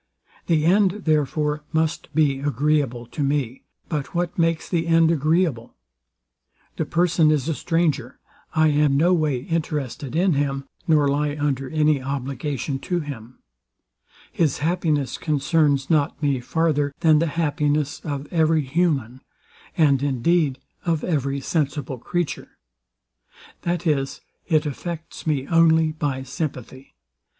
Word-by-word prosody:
The 155 -3 +2
end, 195 +2 +3
therefore, 150 0 0
must 160 0 -1
be 145 -4 +2
agreeable 140 -3 0
to 145 - -6
me. 140 -3 -1 0.2
But 150 0 -4
what 175 0 -1
makes 165 -1 0
the 170 -2 -1
end 165 0 +4
agreeable? 155 -5 0 1.0
The - - -1
person 170 -2 +3
is 150 -2 +1
a 165 - +1
stranger: 155 -6 -1 0.4
I 155 0 +4
am 145 -2 +3
no 175 +5 +4
way 150 -7 +1
interested 150 -3 -3
in 180 +1 +3
him, 140 -1 -1 0.2
nor 150 -3 +4
lie 145 +1 0
under 135 -2 -1
any 155 -3 +2
obligation 135 0 -3
to 175 +4 -2
him: 125 -5 -9 0.9
His 155 -6 +1
happiness 155 -3 0
concerns 145 -2 +1
not 145 -3 +1
me, 140 -3 +1
farther 145 +1 0
than 155 -3 +5
the 165 - +1
happiness 150 -2 0
of 145 -2 -5
every 160 -2 +3
human, 135 -4 0 0.6
and 140 -4 +4
indeed 140 +2 +1 0.3
of 165 -3 0
every 140 -4 -1
sensible 145 -4 -2
creature: 175 +5 -4 1.0
That 175 0 -2
is, 140 -4 0 0.3
it 155 -2 +2
affects 165 +3 -6
me 140 -4 0
only 160 0 +4
by 145 -4 -3
sympathy. 130 -1 -6
150 Hz, 130 wpm, -23 LUFS, 140-165 Hz, 1.0 s, than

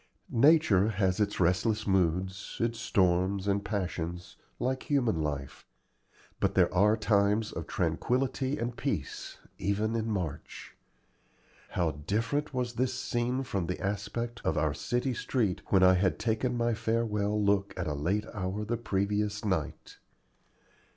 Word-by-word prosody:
Nature 125 - +5
has 95 -3 0
its 105 -1 0
restless 105 +5 +2
moods, 95 0 0
its 115 0 -1
storms 95 +1 +1
and 100 0 +1
passions, 90 -4 -4 0.2
like 130 +1 -2
human 120 - +2
life; 70 -3 -4 0.8
but - - +1
there - - +4
are 105 +4 +4
times 105 0 +2
of - - -6
tranquillity 130 +2 0
and 120 -1 -3
peace, - - -4 0.2
even 105 +4 0
in 115 0 -1
March. 90 -8 -5 0.9
How 85 -3 0
different 110 - -2
was 125 -2 -2
this 130 +1 0
scene 125 +2 -1
from 95 -9 -2
the 90 - -3
aspect 115 +4 -3
of 80 - 0
our 75 -1 +1
city 125 - -1
street 115 -6 -1
when 95 -2 +4
I 95 0 +7
had 95 +1 +2
taken 120 +2 0
my 120 0 +1
farewell 110 -2 0
look 100 -1 +2
at 90 - -2
a 75 - -1
late 90 +9 -1
hour 100 +1 -3
the 120 +2 -1
previous 105 0 -1
night! 95 -8 -3
105 Hz, 140 wpm, -30 LUFS, 95-115 Hz, 0.9 s, I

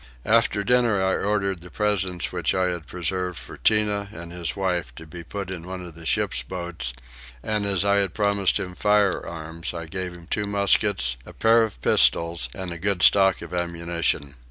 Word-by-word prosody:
After 110 -2 +3
dinner 120 -2 +3
I 95 0 +2
ordered 100 -3 -1
the 90 - -11
presents 95 -4 0
which - - 0
I 95 -1 +2
had 85 -1 -5
preserved 90 0 -3
for - - -9
Tinah 105 -2 +2
and 85 -4 -8
his 85 -3 -4
wife 90 -10 -2
to 80 - -10
be 85 +2 -9
put 100 +2 -6
in 90 -2 -7
one 90 -1 -6
of 85 - -10
the 85 0 -9
ship's - - +1
boats, 85 -8 -4 0.5
and 105 -1 0
as 100 -1 +2
I 100 0 +4
had 100 -2 +1
promised 100 -2 +2
him 90 -1 -5
firearms 85 -5 0
I 85 -1 -5
gave 90 +1 -4
him 85 -1 -13
two 105 +3 -2
muskets, 100 -11 +2
a - - -12
pair 115 +1 +4
of 110 - -4
pistols, 85 -6 +3
and 95 -2 -5
a 85 - -8
good 95 -1 0
stock 95 -1 +5
of - - -9
ammunition. 85 -4 -1
90 Hz, 190 wpm, -24 LUFS, 85-100 Hz, 0.5 s, stock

